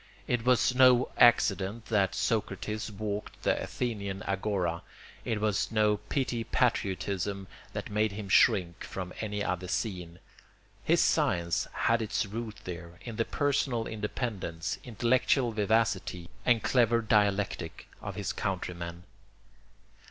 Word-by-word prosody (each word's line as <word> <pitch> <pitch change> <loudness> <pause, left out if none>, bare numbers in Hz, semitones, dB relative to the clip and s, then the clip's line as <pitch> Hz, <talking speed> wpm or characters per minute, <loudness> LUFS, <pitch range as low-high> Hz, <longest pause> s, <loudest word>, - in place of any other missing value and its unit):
It 120 -2 0
was 125 0 +3
no 125 -1 +5
accident 105 -1 +4
that 100 -4 +1
Socrates 110 0 -2
walked 105 0 -5
the - - +1
Athenian 100 -6 -3
agora; 95 -4 -1 0.4
it 110 -3 -1
was 105 0 0
no 105 -1 +3
petty 115 +2 -2
patriotism 100 -5 -1 0.3
that - - -5
made 105 0 +1
him 100 0 -6
shrink 90 -4 +3
from 90 -1 -6
any 105 -1 -2
other 90 0 -2
scene. 90 -3 -3 0.7
His - - +4
science 85 0 +1
had 115 0 +1
its 110 +1 -1
roots 110 +1 -6
there, 85 -1 -7
in 115 -3 -7
the 115 - +1
personal 135 -5 0
independence, 105 -6 -3
intellectual 120 +2 +2
vivacity, 105 -5 0 0.2
and 120 -3 +4
clever 115 -2 +3
dialectic 100 -5 0
of - - -6
his - - -3
countrymen. 85 -2 -4
105 Hz, 120 wpm, -30 LUFS, 95-115 Hz, 0.7 s, no